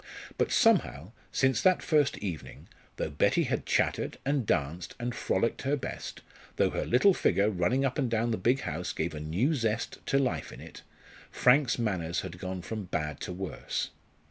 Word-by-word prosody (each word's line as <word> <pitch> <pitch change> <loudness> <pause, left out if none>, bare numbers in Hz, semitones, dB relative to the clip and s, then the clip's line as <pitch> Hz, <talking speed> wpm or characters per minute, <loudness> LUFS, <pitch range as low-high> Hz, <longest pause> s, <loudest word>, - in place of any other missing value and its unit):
But - - 0
somehow, 140 - +3 0.2
since 130 -1 +2
that 185 -1 +4
first 150 -4 +2
evening, 90 -7 -6 0.3
though 80 - -3
Betty 75 - +2
had - - -2
chattered, - - 0
and 140 -5 0
danced, 80 +4 -1
and 120 0 -2
frolicked 115 -1 0
her 140 +2 +1
best, 140 - -6 0.3
though - - +2
her - - -2
little 135 +12 +5
figure 105 - +2
running 105 +9 +1
up 130 +2 -1
and 130 -4 +1
down 115 +1 +1
the 110 - 0
big 120 +8 +2
house 90 +2 -3
gave 85 +1 -2
a 75 - -5
new 90 - 0
zest 115 -5 -1
to 135 - +3
life 130 -3 -1
in - - -10
it, - - -11 0.5
Frank's 125 0 +4
manners 90 -8 -1
had 90 -1 -8
gone 95 -1 -5
from 110 0 -5
bad 75 -5 -3
to - - -5
worse. 95 +1 -4
110 Hz, 180 wpm, -29 LUFS, 90-130 Hz, 0.5 s, little